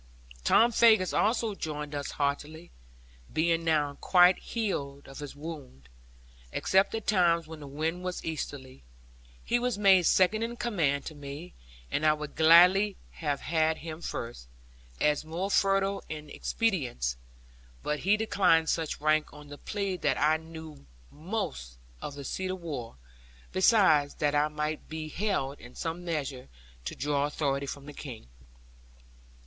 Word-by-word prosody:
Tom 235 - +5
Faggus 220 -5 +5
also 225 0 +1
joined 150 -5 -5
us 145 -1 -3
heartily, 150 +4 -3 0.6
being 165 +1 +1
now 150 -3 +1
quite 180 0 +5
healed 140 -11 -3
of 135 - -10
his 145 -1 -7
wound, 145 - -9 0.6
except 190 +3 +2
at 220 - -4
times 170 -4 +3
when 160 0 -9
the 145 - -9
wind 160 +5 -3
was 180 -1 -4
easterly. 140 - -5 0.6
He 240 - +2
was 245 -3 -1
made 190 -4 +5
second 190 +4 +3
in 230 +1 -2
command 155 -13 0
to - - -6
me; 145 +4 -8 0.4
and - - -1
I 155 0 +5
would 150 -1 -7
gladly 180 +5 +6
have 145 -4 -3
had 160 0 +1
him 160 0 -7
first, 115 - -6 0.5
as 150 0 +2
more 170 +5 -3
fertile 195 0 +2
in 150 -1 -7
expedients; 130 - -1 0.7
but 150 0 -1
he 200 +4 +3
declined 180 -7 +3
such 160 -3 -1
rank 155 0 +2
on 150 0 -13
the 145 - -9
plea 200 -3 -3
that - - 0
I 155 +2 +4
knew 160 - -11 0.2
most 150 - -5 0.2
of 145 - -6
the 140 - -7
seat 185 +7 -3
of 185 0 -3
war; 140 - -6 0.6
besides 185 -8 +4
that 145 -1 0
I 150 +1 +3
might 150 0 -4
be 155 0 -5
held 155 -7 -2
in 120 - -13
some 165 +2 -4
measure 145 -6 -3 0.4
to - - -4
draw 145 0 0
authority 140 -2 -1
from 140 0 -7
the 150 - -9
King. 120 - -9
155 Hz, 150 wpm, -29 LUFS, 145-185 Hz, 0.7 s, gladly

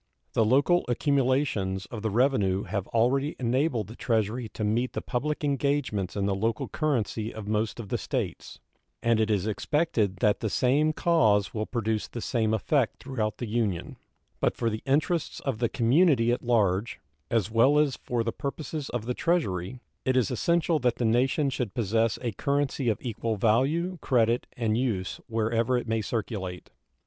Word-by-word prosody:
The 115 - +3
local 140 +10 +3
accumulations 125 - +1
of 110 - -5
the 110 - -1
revenue 105 -5 +2
have 100 -3 -3
already 135 +6 +1
enabled 125 -1 +1
the 110 +5 -11
Treasury 115 0 -1
to 110 - -3
meet 115 +4 0
the - - -3
public 150 +5 -2
engagements 140 -8 0
in 100 -1 0
the 100 - +1
local 110 +3 -1
currency 115 - -1
of 110 -2 -8
most 110 +2 -1
of 105 -4 -7
the - - -1
States, - - -4 0.5
and 115 -1 +3
it 110 0 +1
is 100 -3 +1
expected 110 - 0
that 105 +3 +2
the 110 - -2
same 140 +8 +2
cause 110 - +2
will 110 -1 -2
produce 110 -3 -1
the 120 - -7
same 115 -2 0
effect 115 +3 +1
throughout 115 -5 -2
the 120 - -4
Union; 110 -6 -2 0.4
but - - 0
for 115 -1 0
the 110 - -4
interests 155 +4 0
of 130 -6 -2
the 120 -2 +1
community 130 -1 +3
at 120 - 0
large, 110 -3 +1 0.3
as 110 -3 0
well 130 +6 +4
as 150 -4 +3
for 120 -2 -2
the 115 - -1
purposes 145 0 -5
of 120 -3 -3
the 125 - -1
Treasury, 125 - -1 0.2
it 130 0 +1
is 125 -2 +2
essential 170 +5 +1
that 125 -3 +1
the 120 - -1
nation 130 +6 +2
should 120 -6 -3
possess 115 0 +1
a 120 - -1
currency 140 +2 0
of 110 - +1
equal 115 -2 -2
value, 140 - +1
credit, 120 -1 +2
and 115 -1 +1
use 105 -8 -2
wherever 115 +2 +1
it 120 - -4
may 115 0 0
circulate. 100 -5 -4
115 Hz, 175 wpm, -27 LUFS, 110-135 Hz, 0.5 s, well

